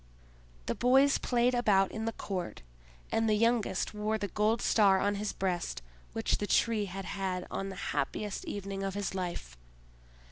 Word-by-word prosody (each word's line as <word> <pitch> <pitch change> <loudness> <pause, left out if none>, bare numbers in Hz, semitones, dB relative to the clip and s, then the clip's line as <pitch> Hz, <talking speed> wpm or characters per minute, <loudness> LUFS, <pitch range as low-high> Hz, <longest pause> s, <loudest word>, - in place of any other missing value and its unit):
The - - 0
boys 265 +3 +4
played 245 0 +2
about 205 -6 +3
in 220 0 -4
the 225 - 0
court, 185 - -5 0.5
and 225 0 +2
the 215 - +4
youngest 230 -3 +1
wore 210 +1 -1
the 205 -1 -3
gold 215 +4 +1
star 200 -3 +4
on 205 +1 +1
his 205 +1 -2
breast 180 - -2 0.3
which - - 0
the 205 - -2
Tree 220 -2 +2
had 195 0 -6
had 185 -2 -3
on 195 - -3
the 190 - -7 0.2
happiest 190 +8 -2
evening 195 -1 -4
of 195 0 -3
his 205 -1 -2
life. 175 - -4
205 Hz, 170 wpm, -31 LUFS, 190-220 Hz, 0.5 s, boys